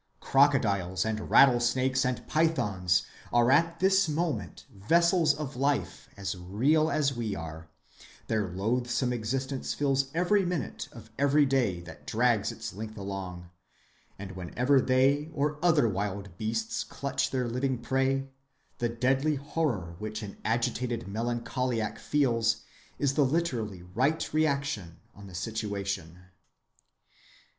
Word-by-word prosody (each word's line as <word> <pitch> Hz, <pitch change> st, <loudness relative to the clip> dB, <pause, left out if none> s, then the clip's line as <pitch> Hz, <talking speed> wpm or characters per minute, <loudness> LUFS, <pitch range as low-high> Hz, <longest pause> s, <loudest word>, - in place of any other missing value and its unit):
Crocodiles 110 Hz, -11 st, +2 dB
and 110 Hz, -1 st, -3 dB
rattlesnakes 130 Hz, 0 st, +4 dB
and 125 Hz, 0 st, -2 dB
pythons 105 Hz, -, +1 dB, 0.3 s
are 120 Hz, +1 st, +4 dB
at 165 Hz, +3 st, +3 dB
this 190 Hz, -1 st, +4 dB
moment 150 Hz, -, -2 dB
vessels 170 Hz, -, +3 dB
of 145 Hz, -2 st, -5 dB
life 140 Hz, +2 st, -1 dB
as 100 Hz, -1 st, -3 dB
real 125 Hz, -, +2 dB
as 140 Hz, -4 st, +1 dB
we 110 Hz, -4 st, -2 dB
are; 80 Hz, -1 st, -8 dB, 0.6 s
their 110 Hz, -3 st, 0 dB
loathsome 120 Hz, +7 st, 0 dB
existence 130 Hz, +4 st, -2 dB
fills 135 Hz, -1 st, +1 dB
every 190 Hz, +4 st, +3 dB
minute 175 Hz, -8 st, -3 dB
of -, -, -13 dB
every 140 Hz, +1 st, +4 dB
day 125 Hz, -10 st, +1 dB
that 85 Hz, -2 st, -12 dB
drags -, -, +2 dB
its -, -, -7 dB
length 110 Hz, +2 st, -7 dB
along; 95 Hz, -3 st, -6 dB, 0.7 s
and 95 Hz, -1 st, -7 dB
whenever 120 Hz, -, +1 dB
they 135 Hz, +4 st, +2 dB
or 150 Hz, +2 st, -1 dB
other 155 Hz, -8 st, +4 dB
wild 100 Hz, -2 st, -3 dB
beasts 220 Hz, -, -2 dB
clutch 140 Hz, -1 st, -2 dB
their 130 Hz, -2 st, -1 dB
living 125 Hz, +2 st, -1 dB
prey, 135 Hz, +2 st, 0 dB, 0.5 s
the 120 Hz, -, 0 dB
deadly 135 Hz, +6 st, +1 dB
horror 135 Hz, -, -2 dB
which 110 Hz, 0 st, -5 dB
an 100 Hz, -, -7 dB
agitated 120 Hz, +1 st, -1 dB
melancholiac 120 Hz, +1 st, -2 dB
feels 115 Hz, -6 st, +1 dB, 0.3 s
is 140 Hz, -2 st, +1 dB
the 145 Hz, -, +3 dB
literally 125 Hz, -, -1 dB
right 130 Hz, -, -1 dB
reaction 140 Hz, -, 0 dB, 0.2 s
on 100 Hz, 0 st, -12 dB
the 90 Hz, -, -11 dB
situation. 100 Hz, -4 st, -3 dB
125 Hz, 125 wpm, -29 LUFS, 100-140 Hz, 0.7 s, rattlesnakes